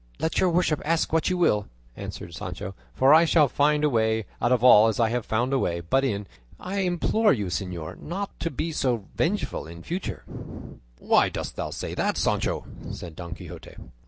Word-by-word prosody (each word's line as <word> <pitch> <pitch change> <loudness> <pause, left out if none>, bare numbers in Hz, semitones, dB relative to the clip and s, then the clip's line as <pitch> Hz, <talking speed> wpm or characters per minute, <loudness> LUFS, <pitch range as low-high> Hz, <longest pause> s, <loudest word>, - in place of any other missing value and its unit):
"Let 160 - 0
your 185 - +4
worship 170 -3 +1
ask 165 +1 0
what 160 - +2
you 180 - 0
will," 105 - +2 0.3
answered - - -7
Sancho, 95 - -6 0.2
"for 135 +3 +5
I 160 +2 +8
shall 155 -2 +4
find 150 +3 +2
a 150 - +4
way 110 -2 +1 0.2
out 120 - +2
of 125 -2 +2
all 110 -3 +8
as 110 - +1
as - - -6
I 115 +1 +2
found 120 +5 -1
a 135 - +3
way 85 -7 0
in; 85 - -7
but 135 0 +4 0.6
I 190 +2 -4
implore 190 +4 +2
you, 105 -6 -2
señor, 90 -5 -4
not - - -16
not 195 +4 -5
to 165 - -1
be 165 +3 -3
so 130 -5 +1 0.2
revengeful - - -1
in 85 +1 -10
future." 180 +3 -4 0.7
"Why - - +3
dost - - -5
thou - - -3
say - - -5
that, - - 0
Sancho?" - - 0 0.3
said 85 -3 -8
Don 85 -1 -7
Quixote. - - -10
135 Hz, 200 wpm, -26 LUFS, 110-165 Hz, 0.7 s, I